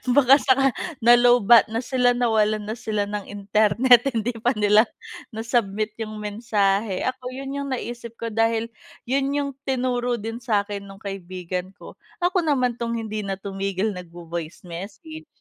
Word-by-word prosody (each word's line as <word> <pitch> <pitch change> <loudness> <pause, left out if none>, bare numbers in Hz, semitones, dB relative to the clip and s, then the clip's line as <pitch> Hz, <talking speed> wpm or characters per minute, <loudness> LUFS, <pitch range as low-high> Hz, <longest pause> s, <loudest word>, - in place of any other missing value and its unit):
baka 270 -1 +7
saka 270 0 +3 0.4
na-low-batt 240 -2 +6
na 225 +3 -3
sila, 250 -1 +2
nawalan 215 -3 +1
na 215 - -5
sila 210 -2 -1
ng 205 -1 -5
internet 215 +5 +3
hindi 225 +2 0
pa 245 +2 +1
nila 210 +2 +4 0.5
na-submit 220 -2 -1
yung 215 -1 -5
mensahe 205 -2 0
ako, 255 0 -4
yun 270 0 -6
yung 280 0 -3
naisip 235 -1 -7
ko 230 -1 -5
dahil, 225 +1 0 0.3
yun 270 +2 0
yung 285 -1 -1 0.2
tinuro 245 -2 0
din 225 +1 -5
sakin 205 -4 -1
nung 195 0 -13
kaibigan 185 -1 -5
ko. - - -13 0.2
Ako 365 +1 +2
naman 250 -4 +1
tong 235 0 -2
hindi 215 -2 -4
na 195 - -1
tumigil 195 +1 -2
nag 180 -2 -8
vo-voice 170 -1 -7
message. 220 - -9
225 Hz, 150 wpm, -23 LUFS, 200-245 Hz, 0.5 s, baka